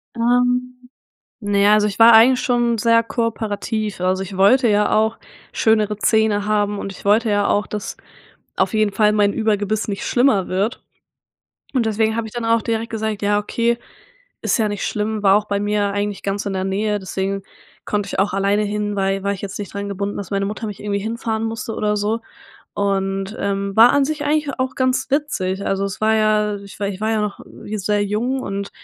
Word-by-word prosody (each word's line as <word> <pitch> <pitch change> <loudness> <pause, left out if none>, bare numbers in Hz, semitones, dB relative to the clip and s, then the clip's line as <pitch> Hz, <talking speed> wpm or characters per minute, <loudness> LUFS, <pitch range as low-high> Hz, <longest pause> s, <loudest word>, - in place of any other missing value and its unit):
Ähm, 250 +1 0 0.5
na 205 -1 0
ja, 205 +1 +5
also 210 0 +3
ich 200 - -6
war 230 +1 +8
eigentlich 245 +3 +6
schon 240 -2 +1
sehr 230 +1 +4
kooperativ, 220 -3 -3
also 185 +1 0
ich 190 0 -7
wollte 235 +6 +5
ja 210 0 +2
auch 220 +1 +1 0.3
schönere 215 -2 +2
Zähne 215 -1 +2
haben 205 -1 0
und 195 - -5
ich - - -14
wollte 215 +2 +3
ja 205 0 +2
auch, 205 - +1
dass 210 -1 -5 0.6
auf - - +1
jeden 215 -2 +2
Fall 210 0 +3
mein 205 -1 +2
Überbiss 215 -1 -1
nicht 200 -1 -3
schlimmer 240 -7 +2
wird 200 +7 -1 0.9
und 245 -3 +2
deswegen 220 0 +1
habe 230 -1 -2
ich - - -15
dann 240 -1 -4
auch 230 0 +2
direkt 230 0 -2
gesagt: 220 -1 -3
„Ja 205 0 +2
okay.“ 235 +3 0 0.7
Ist - - +1
ja 215 -1 +1
nicht 205 -1 -3
schlimm, 210 0 -2
war 195 0 +5
auch 210 0 0
bei 200 0 0
mir 205 -1 0
eigentlich 205 0 -3
ganz 200 +1 -3
in 200 - -2
der 190 0 -2
Nähe, 205 +2 -1
deswegen 195 +1 -3 0.4
konnte 205 -1 -1
ich - - -5
auch 195 -1 0
alleine 200 +2 +1
hin, 205 0 -2
weil 195 0 0
war 200 - +1
ich 195 - -7
jetzt 195 0 -5
nicht 200 -1 -7
dran 200 0 -4
gebunden, 200 +1 -3
dass 200 - -6
meine 195 0 0
Mutter 215 +2 -4
mich 205 -2 -7
irgendwie 200 -1 -2
hinfahren 225 +1 -3
musste 225 0 -4
oder 210 0 0
so 215 +3 -1 0.5
und, 195 0 -1
ähm, 200 0 -2
war 230 +2 +8
an 285 -1 +3
sich 305 0 -3
eigentlich 295 -1 +1
auch 260 0 -1
ganz 260 +1 0
witzig. 200 -10 -1
Also, 195 0 0
es 200 +2 -6
war 220 0 +3
ja 215 -1 +2
ich 200 0 -12
war 200 - -1
ich 195 -1 -5
war 220 +1 0
ja 215 -1 +1
noch 210 -1 -4 0.3
sehr 205 0 0
jung 240 +6 -1
und 200 -1 -4
210 Hz, 205 wpm, -20 LUFS, 200-225 Hz, 0.9 s, war